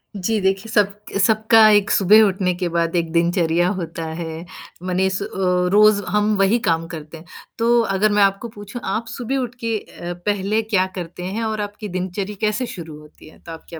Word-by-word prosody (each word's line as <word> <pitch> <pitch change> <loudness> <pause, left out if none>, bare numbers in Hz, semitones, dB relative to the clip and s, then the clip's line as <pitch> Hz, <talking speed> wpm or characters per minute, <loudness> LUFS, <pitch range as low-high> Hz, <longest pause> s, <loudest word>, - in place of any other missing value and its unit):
जी, 210 +3 -1
देखिए 195 +3 -1
सब 205 -2 +3 0.3
सबका 220 +1 +5
एक 205 -1 +3
सुबह 205 +3 +6
उठने 190 -2 +1
के 180 0 -2
बाद 170 0 -1
एक 165 -2 -1
दिनचर्या 170 0 +1
होता 165 -1 -5 0.2
है। 165 0 -6 0.4
मनीस 190 +1 0
अ, - - -3 0.5
रोज़ 210 0 +5
हम 210 +2 +1
वही 195 +5 +3
काम 165 0 +1
करते 160 -1 -9
हैं, 160 - -14 0.3
तो 235 +1 +3
अगर 210 -1 +1
मैं 205 0 +4
आपको 195 +4 +1
पूछूँ, 205 +2 -9
आप 215 +4 -2
सुबह 245 +4 -3
उठ 250 -2 -3
के 225 -1 0
अ, 175 -2 -8
पहले 205 +1 0
क्या 210 -4 +1
करते 180 -1 -7
हैं 200 +5 -3
और 220 -1 -2
आपकी 205 +1 -6
दिनचर्या 190 +3 -4
कैसे 215 +3 0
शुरू 160 -4 -9
होती 150 0 -17
है, - - -19
तो 165 - -11
आप 165 - -10
क्या 165 - -8
195 Hz, 195 wpm, -20 LUFS, 175-215 Hz, 0.5 s, सुबह